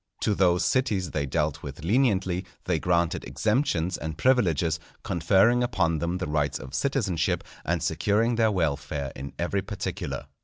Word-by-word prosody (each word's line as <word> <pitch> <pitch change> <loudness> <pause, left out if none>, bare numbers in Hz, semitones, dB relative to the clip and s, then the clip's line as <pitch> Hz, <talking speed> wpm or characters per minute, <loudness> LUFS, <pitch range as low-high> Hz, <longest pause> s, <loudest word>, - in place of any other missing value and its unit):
To 105 - +2
those 90 -2 +3
cities 105 - +1
they 70 -2 -1
dealt 75 +1 -1
with 70 +2 -8
leniently, 95 -4 +2 0.2
they 85 -3 0
granted 85 0 +1
exemptions 105 - 0
and 80 0 -5
privileges, 85 - +2 0.2
conferring 95 +8 +3
upon 95 -10 +1
them 85 +2 -1
the 95 - -3
rights 75 -2 0
of 65 0 -10
citizenship, 85 -2 0 0.2
and - - -1
securing 110 +4 +1
their 115 -1 +3
welfare 75 -6 -1
in 70 +2 -7
every 95 +3 0
particular. 100 +1 -4
90 Hz, 150 wpm, -26 LUFS, 80-105 Hz, 0.2 s, those